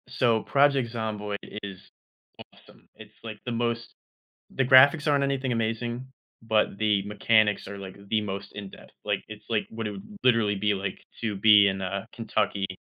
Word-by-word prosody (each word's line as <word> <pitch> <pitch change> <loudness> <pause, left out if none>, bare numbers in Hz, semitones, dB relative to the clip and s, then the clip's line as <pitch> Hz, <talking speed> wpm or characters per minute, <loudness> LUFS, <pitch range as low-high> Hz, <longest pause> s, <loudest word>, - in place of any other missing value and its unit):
So, 115 -3 +2
Project 135 -4 +2
Zomboid 105 -3 -3 0.3
is 100 -2 -7 0.7
awesome. - - -21
It's, 110 0 -14
like, 110 -2 -7
the 125 - -3
most 115 0 -2 0.6
the 135 - +2
graphics 140 +4 +6
aren't 140 -1 +2
anything 135 -2 -1
amazing, 120 +2 -2 0.4
but 110 -3 +1
the 105 -2 +1
mechanics 105 0 +2
are, 100 +1 -7
like, 95 -1 -9
the 110 - +2
most 100 -1 -5
in 100 -1 -7
depth, - - -15
like, - - -1
it's, - - -10
like, - - 0
what 115 -1 -4
it - - -4
would 105 - -11
literally 115 -5 +3
be, 105 +1 +1
like, 95 0 -4 0.2
to 110 -3 -2
be 105 0 +6
in, 95 0 -1
uh, 95 +2 -3
Kentucky 105 -4 -1
110 Hz, 175 wpm, -26 LUFS, 100-120 Hz, 0.7 s, graphics